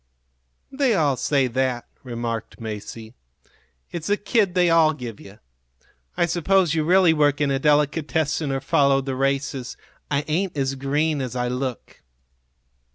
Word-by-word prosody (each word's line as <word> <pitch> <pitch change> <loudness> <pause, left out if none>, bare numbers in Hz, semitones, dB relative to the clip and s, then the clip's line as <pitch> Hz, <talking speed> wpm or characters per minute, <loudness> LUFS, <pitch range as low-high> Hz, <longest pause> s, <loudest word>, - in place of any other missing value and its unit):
"They 265 -4 +1
all 145 -6 +2
say 135 +2 +1
that," 125 0 -1 0.2
remarked 115 -3 -5
Masie. 110 0 -7 0.8
"It's 165 -2 -5
the 205 - +2
kid 205 -4 +1
they 180 -1 +4
all 160 -2 +5
give 120 -7 -8
you. 100 +1 -13 0.8
I - - +3
suppose 175 0 +2
you 160 -1 +1
really 180 0 +5
work 145 -2 +2
in 145 -2 +1
a 135 - 0
delicatessen 150 +1 +1
or 135 0 -2
follow 140 0 +3
the 135 -1 -4
races. 135 -1 -2 0.3
I 145 0 0
ain't 170 +2 -1
as 135 -1 0
green 145 +3 0
as 125 -1 -4
I 125 0 -1
look." 125 -1 -5
140 Hz, 150 wpm, -23 LUFS, 130-160 Hz, 0.8 s, all